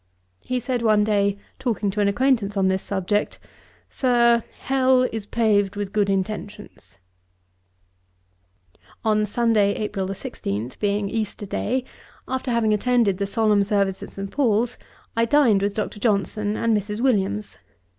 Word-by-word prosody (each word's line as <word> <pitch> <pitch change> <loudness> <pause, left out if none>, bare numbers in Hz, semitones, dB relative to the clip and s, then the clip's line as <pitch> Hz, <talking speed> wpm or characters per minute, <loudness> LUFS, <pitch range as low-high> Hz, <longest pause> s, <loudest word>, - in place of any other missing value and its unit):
He 255 0 -1
said 245 0 -2
one 215 -2 +4
day, 200 -1 +1 0.2
talking 220 -6 -1
to 210 - -4
an 200 - +3
acquaintance 215 -2 +1
on 190 -1 +3
this 190 0 0
subject, 200 +2 -1 0.5
'Sir, 235 -2 +3 0.2
Hell 260 -1 +3
is 220 -2 -5
paved 205 -4 +1
with 200 -1 -4
good 205 -2 +2
intentions.' 205 - -4 2.1
On 215 -1 +2
Sunday, 215 -2 +2
April 195 -3 -3
16, 110 - -4
being 205 0 0
Easter 215 -1 -3
Day, 245 +6 -1 0.4
after 260 0 -3
having 230 -3 +2
attended 215 -3 +2
the 200 - -1
solemn 210 -1 +2
service 200 -2 0
at - - -9
St. 195 0 -6
Paul's, 240 -3 +1 0.4
I 230 0 +3
dined 230 -6 +4
with 200 0 -1
Dr. 215 -1 -3
Johnson 210 -1 0
and 230 -1 +2
Mrs. 210 +1 -3
Williams. 210 -4 0
210 Hz, 140 wpm, -23 LUFS, 200-235 Hz, 2.1 s, one